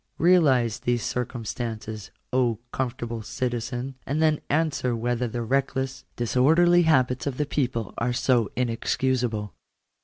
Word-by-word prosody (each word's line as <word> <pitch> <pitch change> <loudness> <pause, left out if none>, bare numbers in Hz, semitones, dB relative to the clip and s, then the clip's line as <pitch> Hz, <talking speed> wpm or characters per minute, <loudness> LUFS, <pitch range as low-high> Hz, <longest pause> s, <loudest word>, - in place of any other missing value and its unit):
Realize 140 - +4
these 120 -1 0
circumstances, 115 -3 -4 0.2
O 125 -3 +2
comfortable 120 -3 -3
citizen, 120 +3 -3
and 145 +3 -2
then 155 -1 +2
answer 145 -5 +1
whether 120 +1 -1
the 120 +1 -3
reckless, 135 +1 -1
disorderly 160 +9 +4
habits 130 -5 +2
of 130 -3 -3
the 150 - 0
people 125 -7 -2
are 120 +1 0
so 120 -3 +2
inexcusable. 120 -2 -1
125 Hz, 120 wpm, -25 LUFS, 115-135 Hz, 0.2 s, Realize